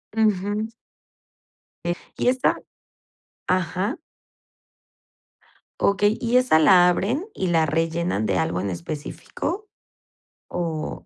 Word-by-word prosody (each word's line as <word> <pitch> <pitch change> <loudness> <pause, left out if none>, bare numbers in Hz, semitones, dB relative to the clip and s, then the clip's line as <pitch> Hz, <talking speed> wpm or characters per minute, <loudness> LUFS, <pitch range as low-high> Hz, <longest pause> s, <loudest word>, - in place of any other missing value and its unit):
Ujú. 210 0 +1 1.2
Eh 175 - 0 0.2
y - - 0
esa 255 0 +2 0.9
ajá. 185 - 0 1.8
Okey, 205 +2 +3
¿y 240 +1 +2
esa 255 -10 +4
la 180 +2 +7
abren 240 - 0
y 190 - -1
la 165 -2 +3
rellenan 165 - 0
de 95 -4 +1
algo 80 +3 0
en 100 0 -2
específico? 155 - -5 0.8
Oh. 165 -3 -4
180 Hz, 100 wpm, -23 LUFS, 160-215 Hz, 1.8 s, la